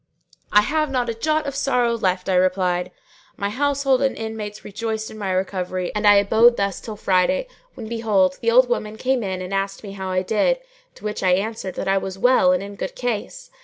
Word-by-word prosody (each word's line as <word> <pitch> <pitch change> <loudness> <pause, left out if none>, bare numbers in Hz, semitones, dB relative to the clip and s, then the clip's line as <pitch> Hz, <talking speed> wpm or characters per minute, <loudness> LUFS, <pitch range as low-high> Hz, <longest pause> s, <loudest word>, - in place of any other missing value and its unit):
"I 210 - +6
have 305 +6 0
not 250 -3 -1
a - - -1
jot 310 +7 0
of 280 - -3
sorrow 250 -4 +1
left." 185 -5 -1
I 190 - +1
replied. 180 -1 +1 0.5
My 200 0 -2
household 275 +1 +1
and 270 -1 0
intimates 220 -2 -6
rejoiced 220 +1 -4
in 220 - -10
my 200 -2 -3
recovery 185 -1 -2
and 210 0 +1
I 205 - +8
abode 220 +4 +5
thus 200 -2 -1
till 220 - -7
Friday, 200 - +1 0.3
when 220 - -7
behold, 210 -5 +1
the 230 - +2
old 250 +2 +5
woman 220 -3 -2
came 260 +1 0
in 190 -3 -3
and 185 +2 -6
asked 195 +1 -2
me 200 - -7
how 190 -1 -5
I 185 0 0
did, 220 - +1 0.4
to - - -17
which 210 0 -3
I 185 -1 +3
answered 200 0 -2
that - - -4
I 195 0 +3
was 190 0 -6
well 260 +5 +4
and 275 - +1
in 200 0 -9
good - - -5
case. - - -4
215 Hz, 215 wpm, -22 LUFS, 190-250 Hz, 0.5 s, I